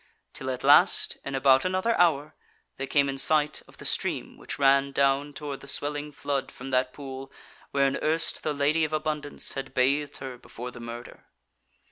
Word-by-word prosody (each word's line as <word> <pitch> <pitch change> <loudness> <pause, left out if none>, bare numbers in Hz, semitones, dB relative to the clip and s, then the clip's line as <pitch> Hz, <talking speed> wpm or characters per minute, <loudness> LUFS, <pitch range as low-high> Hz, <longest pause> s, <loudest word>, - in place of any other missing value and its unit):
Till 130 - -5
at 125 -1 -4
last, 145 +7 +5
in 140 - -4
about 135 0 +5
another 185 +5 +1
hour, 155 -4 +3 0.4
they 135 - -4
came 140 +1 +3
in 135 0 -3
sight 150 +1 +2
of - - -18
the - - -10
stream - - -1
which - - -7
ran 140 0 +4
down 140 +1 +1
toward 145 -2 -6
the 140 - -12
Swelling 145 +1 -2
Flood 140 -1 -3
from 135 +1 -9
that 130 0 +1
pool 135 -1 -8 0.4
wherein 140 0 +1
erst 160 +1 +1
the 155 - -1
Lady 145 +3 +1
of 155 0 -1
Abundance 150 -1 -2
had 135 -1 -6
bathed 140 +3 +1
her 130 -2 -8
before 125 +1 -8
the 120 - -11
murder. 120 0 -9
140 Hz, 180 wpm, -27 LUFS, 135-150 Hz, 0.4 s, last